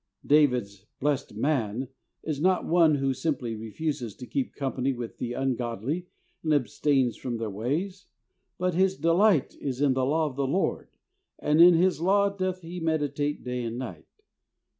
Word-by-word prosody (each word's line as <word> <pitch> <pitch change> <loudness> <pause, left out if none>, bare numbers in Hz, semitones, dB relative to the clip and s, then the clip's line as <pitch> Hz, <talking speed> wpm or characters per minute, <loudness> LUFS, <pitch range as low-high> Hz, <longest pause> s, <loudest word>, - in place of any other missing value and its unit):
David's 125 -9 +2
"blessed 140 -6 -1
man" 125 -1 -1 0.4
is 150 -2 -3
not 185 +1 +2
one 165 -3 +4
who 135 -1 0
simply 130 -4 -2
refuses 115 +1 -4
to 125 - -9
keep 135 +2 -3
company 135 -1 -1
with 120 -2 -7
the 120 0 -3
ungodly 130 - -2 0.3
and 155 -2 +2
abstains 135 -2 +1
from 120 -2 -4
their 110 -2 -3
ways, 155 - -3 0.5
"but 180 0 0
his 190 +2 +2
delight 170 -2 +3
is 135 -3 -3
in 140 -2 +3
the 130 0 0
law 155 +4 +2
of 140 -4 -4
the 140 -1 0
Lord 180 +8 -1 0.5
and 150 +2 +3
in 175 0 +9
His 180 0 +2
law 200 +3 +3
doth 185 -1 -2
he 175 +2 -7
meditate 150 -3 -1
day 125 0 -3
and 115 0 -4
night." 95 -11 -7
140 Hz, 160 wpm, -27 LUFS, 125-165 Hz, 0.5 s, in